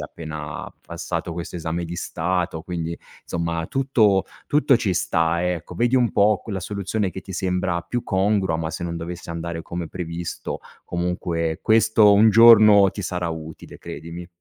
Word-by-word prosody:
appena 75 -2 -7 0.2
passato - - -4
questo 85 0 -6
esame 85 0 -3
di 85 +1 -6
Stato, 85 -1 -2
quindi, 85 -2 -4 0.2
insomma 85 -1 -3
tutto 115 -8 +2 0.2
tutto 145 -3 +4
ci 105 -5 -1
sta, 85 +1 +1
ecco. 85 -1 -5
Vedi 120 +2 +2
un 125 -3 +3
po' 105 0 +3
qu - - -9
la 100 - -2
soluzione 100 +1 -2
che 95 - -7
ti 95 - -10
sembra 90 -2 -1
più 120 +8 -3
congrua, 95 -3 +1
ma 80 -1 -3
se 85 - -6
non 85 -1 -3
dovesse 85 +1 -7
andare 85 0 -5
come 85 -1 -5
previsto, 85 0 -5 0.3
comunque 85 -2 -2
questo 110 -1 +5
un 105 +2 +6
giorno 110 -3 +8
ti 100 - -7
sarà 90 -1 -2
utile, 80 -1 -8
credimi. 85 +2 -8
90 Hz, 160 wpm, -23 LUFS, 85-100 Hz, 0.3 s, giorno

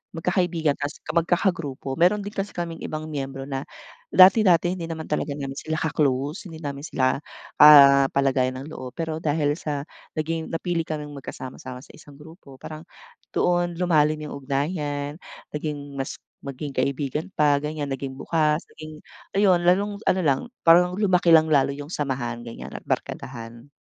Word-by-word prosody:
magkakaibigan 165 -3 0
tpoas 145 +2 -4
magkakagrupo. 165 -5 0
Meron 200 +4 +3
din 205 - -6
kasi 200 +1 -3
kaming 170 -2 -4
ibang 155 0 -4
miyembro 135 -2 -4
na 135 -1 -3 0.5
dati-dati 185 -2 +6
hindi 170 -3 -5
naman 160 -1 -6
talaga 150 - -1
namin 135 -2 -5
sila 160 0 -3
ka-close, 150 - -1
hindi 160 -2 -10
namin 140 0 -5
sila, 130 -2 +1 0.4
ah, 140 -2 +9
kapalagayan 130 -2 +1
ng 155 - -10
loob. 125 -1 -8
Pero 160 -1 -3
dahil 150 -2 0
sa 145 -2 -3 0.3
naging 160 +1 -2
napili 165 0 -1
kaming 150 -2 -5
magkasama-sama 130 -1 -8
sa - - -15
isang 145 -2 -15
grupo 150 -1 -14
parang 155 0 -8 0.5
doon 175 -1 +1
lumalim 155 -3 +2
'yong 150 - -6
ugnayan, 145 +1 -2 0.3
naging 145 -2 -5
mas 135 - -3 0.3
maging 140 +1 -6
kaibigan 140 +3 -1
pa, 145 -1 +3
ganyan. 150 -1 -4
Naging 135 0 -4
bukas, 155 +2 +1 0.2
naging 155 -1 -10 0.3
ayun, 190 -3 +4
lalong 200 +3 +2
ano 185 - +2
lang, 140 -4 +2 0.2
parang 175 +2 +6
lumaki 180 -4 +3
lang 160 0 +4
lalo 140 -1 +3
'yong 145 +2 -8
samahan, 130 -5 -2
ganyan 115 - -8
at - - -8
barkadahan. 115 0 -5
150 Hz, 155 wpm, -24 LUFS, 140-165 Hz, 0.5 s, ah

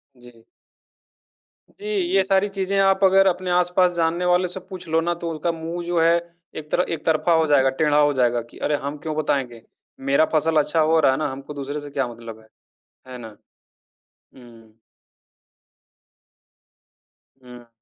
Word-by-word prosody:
जी। 120 -2 -18 1.4
जी, 410 - -10
ये 370 - +1
सारी 195 +1 +2
चीज़ें 195 0 -2
आप 195 0 +2
अगर 195 0 +5
अपने 185 0 -1
आस-पास 180 0 +2
जानने 170 +1 -1
वाले 180 +1 +2
से 180 +2 -6
पूछ 185 -1 -11
लो 160 +1 +2
ना 175 +1 -1
तो 170 - -2
उसका 160 +2 -2
मुँह 165 +1 -6
जो 175 0 0
है 165 +1 +4 0.5
एक 150 - -22
तर - - +2
एक 165 -2 -4
तरफ़ा 160 +2 +2
हो 160 -1 +3
जाएगा, 135 -3 +4
टेढ़ा 150 +2 +1
हो 145 0 +3
जाएगा 120 -2 +1
कि - - -16
अरे! 150 - -1
हम 145 +1 -5
क्यों 155 -1 -3
बताएँगे? 135 -6 -2 0.4
मेरा 140 +3 +2
फसल 160 +1 +2
अच्छा 165 - -1
हो 160 +1 +3
रहा 140 - +4
है 130 - -1
ना, 155 - -1
हमको 135 +2 -9
दूसरे 145 +1 -5
से 145 0 -9
क्या 135 -2 -2
मतलब 115 -2 -10
है? 110 - -22 0.6
है 130 -1 -9
ना? 110 -3 -11 1.0
हुँ। 115 -3 -17 2.7
हुँ। 125 -1 -14
155 Hz, 170 wpm, -22 LUFS, 135-180 Hz, 2.7 s, अगर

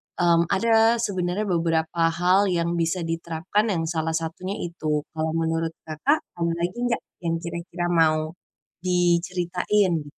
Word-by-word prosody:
mmm, 170 -1 +3
ada 225 +3 +4
sebenarnya 185 0 -1
beberapa 165 -3 +1
hal 180 +4 +3
yang 170 -1 0
bisa 170 +2 0
diterapkan 165 +5 -1
yang 180 -6 0
salah 160 0 -1
satunya 165 +4 -3
itu. 155 -3 -2
Kalau 160 0 -2
menurut 165 0 -1
Kakak, 270 - 0 0.2
ada 170 0 +1
lagi 175 +2 -2
enggak 245 -1 0 0.2
yang 165 -1 -1
kira-kira 170 +1 -4
mau 155 -2 +3 0.5
diceritain? 180 0 +1
170 Hz, 130 wpm, -24 LUFS, 165-185 Hz, 0.5 s, ada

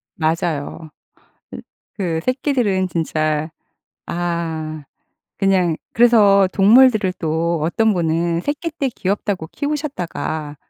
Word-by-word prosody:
맞아요. 160 -1 -2 0.7
으 - - -7 0.4
그 170 -5 -1
새끼들은 245 -8 0
진짜 155 -2 -1 0.6
아 165 -3 -3 0.5
그냥 185 -4 +2 0.2
그래서 205 -5 +5
동물들을 215 -1 +5
또 165 0 -1
어떤 220 +7 +2
분은 170 0 0
새끼 300 - -3
때 280 -4 -1
귀엽다고 195 -5 -2
키우셨다가 185 - -4
175 Hz, 215 characters per minute, -19 LUFS, 160-220 Hz, 0.7 s, 그래서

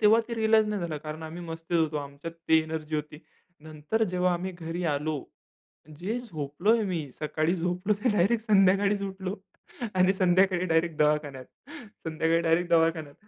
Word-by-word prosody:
तेव्हा 220 +1 +6
ते 235 - -3
रिअलाईज 220 -1 +3
नाही 210 -2 -2
झालं 165 -3 -3
कारण 155 +1 -6
आम्ही 160 +2 -7
मस्तीत 165 +1 -3
होतो, 160 -1 +1
आमच्यात 145 +3 -6 0.2
ती 160 - +6
एनर्जी 155 -1 -5
होती. 150 0 -5 0.4
नंतर 155 +8 -3
जेव्हा 180 0 +2
आम्ही 185 +2 -4
घरी 175 0 -5
आलो, 150 +1 -2 0.8
जे 210 +8 -2
झोपलोय 180 - 0
मी 165 -7 -3
सकाळी 155 +3 0
झोपलो 180 +4 0
ते - - +4
डायरेक्ट 210 +4 +2
संध्याकाळीचं 200 0 +4
उठलो 190 0 -5 0.6
आणि 185 +1 +4
संध्याकाळी 185 -1 +3
डायरेक्ट 165 -1 +1
दवाखान्यात. 150 -3 +1 0.6
संध्याकाळी 160 +1 +1
डायरेक्ट 170 +1 +1
दवाखान्यात 160 -3 +2
170 Hz, 155 wpm, -27 LUFS, 155-190 Hz, 0.8 s, तेव्हा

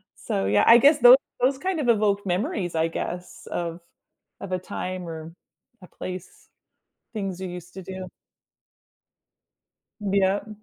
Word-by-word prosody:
So, 95 - -2
yeah, 105 +1 +3
I 230 - +10
guess 290 +4 +5
those 245 +2 +9 0.2
those 265 +2 +3
kind 370 +2 -2
of 245 - 0
evoke 205 -2 +2
memories 180 - -2
I 160 +1 +2
guess 180 +2 -6
of 170 0 -3 0.6
of 195 - -7
a 185 - 0
time 185 0 -5
or 160 0 -7 0.5
a - - -12
place, 185 +1 -9 0.6
things 195 -4 -4
you 185 - -4
used 180 0 -9
to 190 - -7
do. 185 0 -7 1.9
Yep, 200 +1 +1
185 Hz, 140 wpm, -25 LUFS, 175-215 Hz, 1.9 s, I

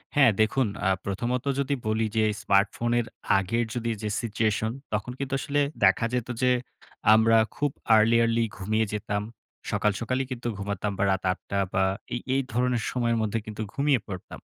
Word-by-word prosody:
হ্যাঁ, 135 -5 +6
দেখুন 120 +3 +2 0.2
আ - - +4 0.2
প্রথমত 120 +6 -2
যদি 140 +1 0
বলি 110 +1 +1
যে 110 - +4 0.2
স্মার্টফোনের 115 +4 +2 0.3
আগের 115 +5 0
যদি 115 -1 -1
যে 105 - -2
সিচুয়েশন, 110 -1 0 0.2
তখন 105 +4 -2
কিন্তু 140 0 -3
আসলে 145 +1 0 0.2
দেখা 95 +4 +4
যেত 125 -2 -1
যে 125 0 +4 0.6
আমরা 110 +1 +5 0.2
খুব 145 -1 0 0.3
early, 115 +2 +5
early 115 0 +2
ঘুমিয়ে 110 +4 0
যেতাম। 105 -1 -2 0.5
সকাল, 105 - +2
সকালই 130 +3 -1
কিন্তু 120 -1 -4
ঘুমাতাম 100 0 -3
বা, - - +1
রাত 95 0 -1
৮ 90 - -4
টা 100 - +1
বা, 95 - +3 0.3
এই 120 - -1 0.2
এই 135 - +3
ধরনের 125 -1 +1
সময়ের 120 -2 +1
মধ্যে 110 +1 0 0.3
ঘুমিয়ে 140 -2 +2
পড়তাম। 95 -3 -8
115 Hz, 165 wpm, -26 LUFS, 105-125 Hz, 0.6 s, হ্যাঁ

